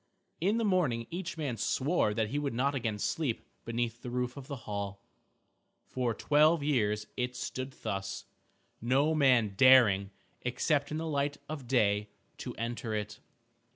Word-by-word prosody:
In 200 +7 +2
the 230 - +1
morning 155 - +1
each 180 0 -4
man 140 -7 -2
swore 130 - +1
that 110 -1 0
he 145 - -1
would 140 -4 -2
not 140 +4 +1
again 115 -6 -2
sleep 130 +3 -2 0.2
beneath 115 0 -2
the 125 - -6
roof 125 0 -2
of 140 -2 -9
the 140 - -4
hall. 100 -1 -5 0.8
For 125 -3 -2
twelve 150 +1 +4
years 105 -7 +1
it 125 0 -2
stood 130 +2 -4
thus, 95 +1 -3 0.6
no 135 +7 +2
man 125 -8 +4
daring, 110 -6 +6 0.3
except 140 +4 0
in 155 - -3
the 160 - -3
light 145 -2 -1
of 145 -5 -6
day, 105 -4 +2 0.3
to - - -6
enter 115 0 -3
it. 105 0 -4
125 Hz, 155 wpm, -31 LUFS, 110-145 Hz, 0.8 s, daring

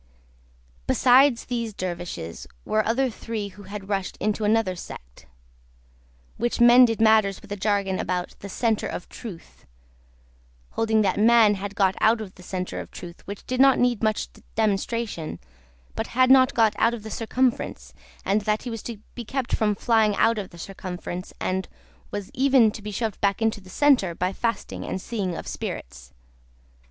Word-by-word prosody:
Besides 255 0 +5
these 235 -4 -3
Dervishes, 175 - -5 0.2
were 215 0 +1
other 255 +3 +1
three 215 -2 -5
who 200 +1 -14
had 200 -1 -7
rushed 195 -2 -2
into 215 +1 -1
another 215 -3 +2
sect, - - -11 1.1
which 240 +1 -1
mended 240 -1 +7
matters 220 -3 +4
with 210 - -16
a - - -1
jargon 200 -1 0
about 180 -1 -2
"the 200 - -8
Centre 225 +1 0
of - - -6
Truth:" 200 -9 -11 1.0
holding 220 -1 +2
that 195 0 0
Man 225 -1 +6
had 200 0 -5
got 195 -2 +2
out 225 +1 +4
of 205 -4 -7
the - - -16
Centre 180 0 -4
of - - -7
Truth 175 -1 -10
which 200 0 -7
did 255 0 0
not 270 -1 +6
need 245 -3 +2
much 215 -1 0 0.3
demonstration 215 -4 -1 0.6
but - - -3
had 255 0 +5
not 265 0 +6
got 225 -2 +4
out 230 +1 +3
of 220 - -10
the 220 - -7
Circumference, 250 +3 -1 0.3
and 205 +2 +2
that 210 +1 -1
he 245 - -5
was 225 -2 -5
to 235 -2 -6 0.2
be 240 - -6
kept 260 +2 -2
from 210 -2 +1
flying 220 -1 +2
out 225 +1 +3
of 195 - -6
the 170 - -14
Circumference, 180 0 -6
and 190 0 -2 0.4
was 205 -2 -6
even 260 -4 +4
to 210 - -9
be 210 - -6
shoved 215 0 -3
back 200 -1 +1
into 220 -2 0
the 185 - -15
Centre, 220 - +3
by 180 +2 -1
fasting 230 +2 -3
and - - -3
seeing 190 -4 -3
of - - -7
spirits. 60 +1 -6
215 Hz, 170 wpm, -25 LUFS, 190-230 Hz, 1.1 s, mended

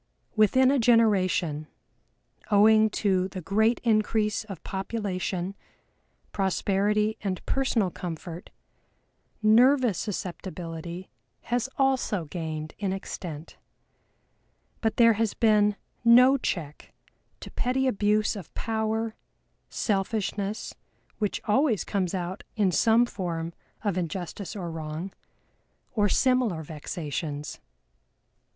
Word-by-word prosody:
Within 255 +5 +5
a 280 - +2
generation, 190 -10 +2 0.8
owing 215 +1 +6
to 190 -3 +1
the 190 0 -7
great 220 +6 +2
increase 215 -1 +1
of 195 -6 -9
population, 190 -2 -3 0.8
prosperity 205 +2 +1
and 190 -3 -3
personal 235 -8 +1
comfort, 170 0 -7 0.9
nervous 240 - +5
susceptibility 175 -3 -6 0.3
has 245 +1 -1
also 260 -9 +1
gained 155 -1 -5
in 200 -2 -1
extent, 175 -5 -6 1.2
but 220 -2 0
there 230 -1 +7
has 220 -1 -1
been 210 -2 +3 0.3
no 250 +3 +7
check 165 - -4 0.5
to - - -9
petty 260 +2 0
abuse 210 -3 +2
of 195 -6 -9
power, 220 0 -1 0.6
selfishness, 205 0 -2 0.5
which 210 -2 -1
always 230 - +2
comes 190 -2 -1
out 185 +1 -4
in 205 -4 +2
some 225 +6 +4
form 170 -6 -4 0.3
of 200 -4 0
injustice 180 +3 -5
or 175 -4 -4
wrong, 160 +3 -5 0.8
or 205 -3 +2
similar 250 - +2
vexations. 150 -1 -5
205 Hz, 100 wpm, -27 LUFS, 180-225 Hz, 1.2 s, there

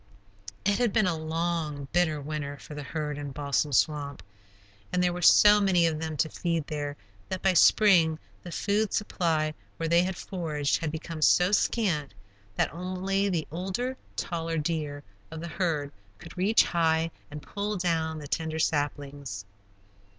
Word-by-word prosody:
It 205 +2 +2
had 240 -3 +2
been 215 +1 +3
a 180 -2 +1
long, 160 -2 -2
bitter 170 -4 +2
winter 145 -1 -4
for 150 - -11
the 145 - -5
herd 150 0 -4
in 145 -1 -5
Balsam 145 +1 0
Swamp, 145 +1 0 0.7
and 180 0 +1
there 180 -1 +2
were 180 - -5
so 210 +4 +7
many 180 -4 +4
of 160 -2 0
them 160 -1 -4
to 155 - +2
feed 165 -1 -2
there 145 -1 -4 0.3
that 185 - -4
by 190 -1 +4
spring 175 -4 +5 0.2
the 175 - -9
food 205 +3 0
supply 160 -6 0 0.2
where 165 - -2
they 170 +1 +5
had 185 0 -2
foraged 155 -6 -1
had 160 -2 -2
become 160 0 -6
so 180 +4 +5
scant 170 - +1 0.4
that - - 0
only 185 +3 -1
the 170 -5 -1
older, 190 +10 -3 0.2
taller 165 -1 -2
deer 150 -2 -2 0.3
of 160 - -7
the 170 - -5
herd 160 -4 -1 0.3
could - - -12
reach 195 +5 +4
high 165 -1 +1 0.2
and 150 0 -8
pull 205 0 -3
down 165 -3 0
the 150 -2 -7
tender 160 +1 -2
saplings. 145 -8 -2
165 Hz, 165 wpm, -28 LUFS, 150-180 Hz, 0.7 s, so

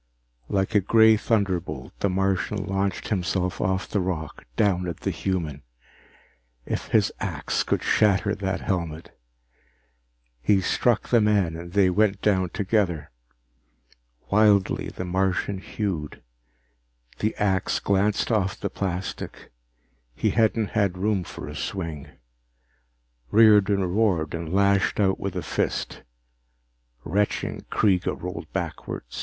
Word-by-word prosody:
Like 95 +2 0
a 105 - +5
gray 110 +3 +5
thunderbolt, 95 - -1
the 100 - +1
Martian 95 +1 0
launched 95 -1 -2
himself 90 -2 -1
off 95 0 0
the 105 - -1
rock, 85 -5 -4
down 90 -4 +2
at 85 - -5
the - - -1
human. 80 -7 -3 1.0
If - - -3
his - - +2
axe - - -2
could - - -1
shatter 100 -1 +3
that 95 -2 -2
helmet 85 -4 -3 1.3
He 95 +10 +3
struck 115 +4 +1
the 120 -2 +5
man 100 -6 +2
and 85 +1 -8
they 95 -2 +4
went 100 +1 +2
down 95 -4 +1
together. 95 -6 -1 1.2
Wildly, 100 -2 +3
the 90 - -6
Martian 95 +2 0
hewed. 95 - -4 1.0
The 110 - 0
axe 95 -2 0
glanced 100 +3 +1
off 100 -4 0
the - - -3
plastic 95 -1 -5 0.6
he - - +1
hadn't 110 -1 +2
had 100 -4 +1
room 100 0 0
for - - -8
a - - -7
swing. 85 -7 -4 1.2
Riordan 105 -3 +5
roared 90 -5 +1
and 85 -1 -4
lashed 100 +1 +2
out 95 -2 +2
with 95 -2 -4
a 90 - -3
fist. - - -2 1.0
Retching, 105 +1 -1
Kreega 95 -4 +1
rolled 85 -3 -6
backward. - - -4
95 Hz, 125 wpm, -25 LUFS, 90-105 Hz, 1.3 s, a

